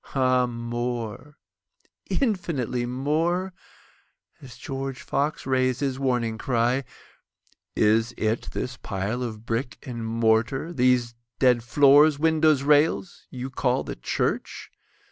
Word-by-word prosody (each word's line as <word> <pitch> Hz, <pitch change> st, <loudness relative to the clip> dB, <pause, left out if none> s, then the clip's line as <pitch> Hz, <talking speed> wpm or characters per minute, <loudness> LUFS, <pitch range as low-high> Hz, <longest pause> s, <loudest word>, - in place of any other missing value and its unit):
Ah 130 Hz, -1 st, +3 dB
more—infinitely 120 Hz, -, -4 dB
more;(As 150 Hz, -2 st, -5 dB
George 135 Hz, +1 st, -5 dB
Fox 145 Hz, +3 st, -2 dB
rais'd 130 Hz, 0 st, +1 dB
his 135 Hz, -2 st, -1 dB
warning 120 Hz, -4 st, -1 dB
cry, 125 Hz, +1 st, 0 dB, 0.9 s
"Is 110 Hz, +2 st, +3 dB
it 110 Hz, +1 st, -1 dB
this 125 Hz, -1 st, -4 dB
pile 105 Hz, +3 st, -3 dB
of 110 Hz, -2 st, -5 dB
brick 120 Hz, +2 st, -2 dB
and 120 Hz, -3 st, -6 dB
mortar—these 120 Hz, +3 st, +1 dB, 0.2 s
dead 125 Hz, -2 st, +4 dB
floors, 145 Hz, +5 st, +5 dB
windows, 155 Hz, -2 st, +3 dB
rails—you 145 Hz, -3 st, 0 dB
call 125 Hz, -1 st, 0 dB
the -, -, -6 dB
church? -, -, -3 dB
125 Hz, 95 wpm, -25 LUFS, 120-140 Hz, 0.9 s, floors